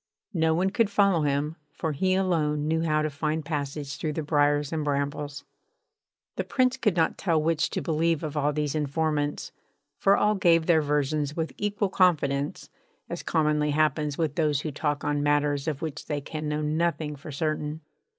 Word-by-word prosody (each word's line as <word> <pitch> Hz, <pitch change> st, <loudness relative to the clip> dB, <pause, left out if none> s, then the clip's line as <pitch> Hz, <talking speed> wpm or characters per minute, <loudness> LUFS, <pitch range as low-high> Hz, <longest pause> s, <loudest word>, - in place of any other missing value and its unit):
No 160 Hz, -2 st, +2 dB
one 185 Hz, +3 st, +1 dB
could 225 Hz, 0 st, +2 dB
follow 200 Hz, -4 st, +3 dB
him, 145 Hz, +2 st, 0 dB, 0.2 s
for 160 Hz, -, -2 dB
he 185 Hz, +6 st, +1 dB
alone 155 Hz, -6 st, +1 dB
knew 160 Hz, +1 st, +1 dB
how 155 Hz, -2 st, +1 dB
to 155 Hz, -, 0 dB
find 155 Hz, +2 st, -1 dB
a -, -, -16 dB
passage 145 Hz, -2 st, -4 dB
through 155 Hz, -1 st, -2 dB
the 160 Hz, -, -3 dB
briars 145 Hz, 0 st, +2 dB
and 155 Hz, -1 st, -1 dB
brambles. 145 Hz, 0 st, -2 dB, 0.9 s
The -, -, 0 dB
Prince 255 Hz, -1 st, +1 dB
could 210 Hz, -8 st, +1 dB
not 165 Hz, -, +1 dB
tell 165 Hz, -4 st, +2 dB
which 160 Hz, 0 st, +1 dB
to -, -, -3 dB
believe 165 Hz, 0 st, +1 dB
of 155 Hz, -1 st, -4 dB
all 150 Hz, 0 st, +1 dB
these 150 Hz, -1 st, -1 dB
informants, 150 Hz, 0 st, -1 dB, 0.5 s
for 195 Hz, 0 st, +4 dB
all 210 Hz, -, +3 dB
gave 170 Hz, -5 st, +3 dB
their 160 Hz, -2 st, +4 dB
versions 150 Hz, 0 st, 0 dB
with 160 Hz, -1 st, -2 dB
equal 205 Hz, -1 st, -1 dB
confidence, 150 Hz, -7 st, +1 dB, 0.4 s
as -, -, -3 dB
commonly 150 Hz, -1 st, +1 dB
happens 150 Hz, -1 st, +1 dB
with 160 Hz, -4 st, 0 dB
those 150 Hz, -3 st, +1 dB
who 155 Hz, -, -4 dB
talk 145 Hz, 0 st, -2 dB
on 145 Hz, 0 st, 0 dB
matters 145 Hz, 0 st, +1 dB
of 150 Hz, -2 st, -2 dB
which 150 Hz, -3 st, -5 dB
they 145 Hz, -1 st, -1 dB
can 155 Hz, +2 st, -5 dB
know 150 Hz, 0 st, -1 dB
nothing 155 Hz, 0 st, -1 dB
for 145 Hz, +2 st, -9 dB
certain. 155 Hz, +1 st, -2 dB
155 Hz, 185 wpm, -27 LUFS, 145-165 Hz, 0.9 s, for